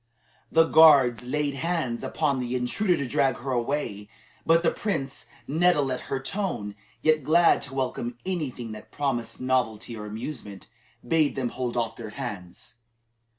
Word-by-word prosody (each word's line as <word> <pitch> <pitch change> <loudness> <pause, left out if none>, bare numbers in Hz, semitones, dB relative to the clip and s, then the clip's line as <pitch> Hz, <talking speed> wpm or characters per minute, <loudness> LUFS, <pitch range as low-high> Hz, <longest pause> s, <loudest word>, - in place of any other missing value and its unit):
The 165 - +6
guards 140 -8 +6
laid 145 +2 -1
hands 140 -5 -2
upon 145 -4 0
the 125 0 -2
intruder 170 +9 +1
to 140 -3 -2
drag 130 +1 +1
her 135 +2 -5
away, 120 -5 -2 0.4
but 165 +1 +5
the 165 - +3
prince, 135 -11 -3 0.2
nettled 155 -3 +3
at 125 - -2
her 135 - -1
tone, 135 - -3 0.3
yet 155 -2 +3
glad 165 +4 +4
to 135 -1 -7
welcome 125 -2 -2
any 175 -7 -1
thing 120 -2 -8
that 105 0 -10
promised 135 -5 -2
novelty 120 -3 -1
or 105 -1 -7
amusement, 110 -3 -7 0.4
bade 160 -3 +2
them 130 -3 -1
hold 125 -1 -3
off 115 -2 -1
their 115 -2 -7
hands. 105 -8 -7
130 Hz, 155 wpm, -26 LUFS, 120-155 Hz, 0.4 s, The